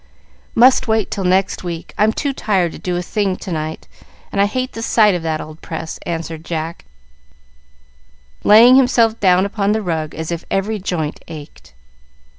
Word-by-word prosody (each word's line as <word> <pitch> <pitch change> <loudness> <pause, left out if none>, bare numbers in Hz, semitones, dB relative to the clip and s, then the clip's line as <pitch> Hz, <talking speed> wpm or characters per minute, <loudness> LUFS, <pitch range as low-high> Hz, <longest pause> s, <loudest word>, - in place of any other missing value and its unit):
"Must 255 +2 +5
wait 220 -2 0
till 195 - -3
next 185 +1 +1
week. 170 -2 -6
I'm 215 +1 +3
too 280 +4 -2
tired 190 -9 0
to - - -10
do 180 -1 -2
a 175 - -2
thing 195 0 -1
to 185 - -8
night, 155 -1 -4 0.4
and 200 - +1
I 200 - +4
hate 255 +4 -3
the 225 - -6
sight 215 -3 +4
of 175 - -2
that 160 -1 -2
old 155 +1 -9
press," 160 - -6
answered 165 -1 -4
Jack, 165 0 -5 1.6
laying 235 +5 +8
himself 235 -4 +3
down 185 -1 +4
upon 200 0 0
the 220 - -1
rug 160 -4 -3
as 160 +1 -5
if 170 -1 -4
every 205 +2 -1
joint 165 -5 -3
ached. 150 - -11
185 Hz, 175 wpm, -18 LUFS, 165-220 Hz, 1.6 s, laying